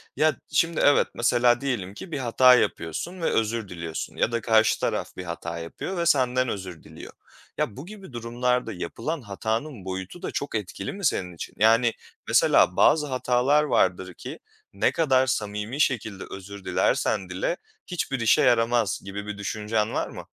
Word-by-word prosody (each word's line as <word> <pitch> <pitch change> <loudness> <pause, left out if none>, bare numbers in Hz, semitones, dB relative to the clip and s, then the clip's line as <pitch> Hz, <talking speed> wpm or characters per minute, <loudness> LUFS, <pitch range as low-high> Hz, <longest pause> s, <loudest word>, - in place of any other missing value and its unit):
Ya, 155 -2 +3 0.2
şimdi 165 +2 +2
evet, 145 - +5
mesela 120 0 +3
diyelim 120 -9 -2
ki 170 - -10
bir 145 - -2
hata 125 +1 +6
yapıyorsun 125 - -2
ve - - -1
özür 110 -2 -1
diliyorsun 85 -2 -5
ya - - +1
da 115 0 -1
karşı 110 0 +3
taraf - - -2
bir 90 - -5
hata 85 -1 -5
yapıyor 85 - -6
ve 170 - 0
senden 130 -5 +2
özür 95 -6 -6
diliyor. - - -12 0.4
Ya, 100 - -2
bu 140 - -7
gibi 195 -6 -11
durumlarda 120 +2 -1
yapılan 115 - -4
hatanın 110 +2 -4
boyutu 95 - -6
da - - -4
çok 140 - -4
etkili 95 -2 -4
mi 200 -1 -5
senin 90 - 0
için? - - -8
Yani, 115 +2 +4 0.3
mesela - - +4
bazı 150 -1 +4
hatalar 130 +2 +2
vardır 95 -9 +1
ki - - -9 0.3
ne 100 - +2
kadar 130 -5 +2
samimi 105 +1 -2
şekilde 110 -8 0
özür 95 0 -9
dilersen 95 0 +1
dile 95 - -2 0.3
hiçbir 145 -7 -2
işe 115 -1 +4
yaramaz 115 -3 +2
gibi 100 +1 -6
bir 105 -1 -5
düşüncen 105 +1 -2
var - - -1
mı? - - -9
115 Hz, 170 wpm, -25 LUFS, 100-130 Hz, 0.4 s, hata